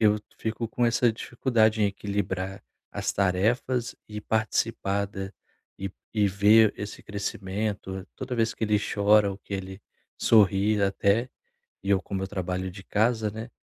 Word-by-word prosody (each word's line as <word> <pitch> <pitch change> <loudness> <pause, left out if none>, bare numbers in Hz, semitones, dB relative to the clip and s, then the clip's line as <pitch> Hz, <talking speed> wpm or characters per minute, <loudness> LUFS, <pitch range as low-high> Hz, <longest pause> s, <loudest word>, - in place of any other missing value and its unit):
eu 105 -1 +4 0.2
fico 110 +1 -2
com 120 +2 0
essa 120 0 +3
dificuldade 110 -2 +1
em - - +5
equilibrar 95 -1 -3 0.3
as - - -2
tarefas 115 +6 +1
e 105 0 -6
participar 100 -2 0
da 95 -1 -6 0.5
e 95 0 -4 0.2
e 105 -2 +3
ver 105 +3 +5
esse 105 0 -6
crescimento 100 -1 -4
toda 130 -1 -4
vez 115 -1 +1
que - - -2
ele 105 -1 +2
chora 105 0 +3
ou 95 - -6
que - - -12
ele 95 0 -5 0.4
sorri 105 -1 +4
até, 100 +4 +2 0.5
e 100 - -5
eu 95 -2 +4
como 95 0 -4
eu - - -3
trabalho 95 -1 -3
de 95 +1 -10
casa, 110 +1 +1
né, 110 +3 -7
105 Hz, 155 wpm, -27 LUFS, 95-110 Hz, 0.5 s, em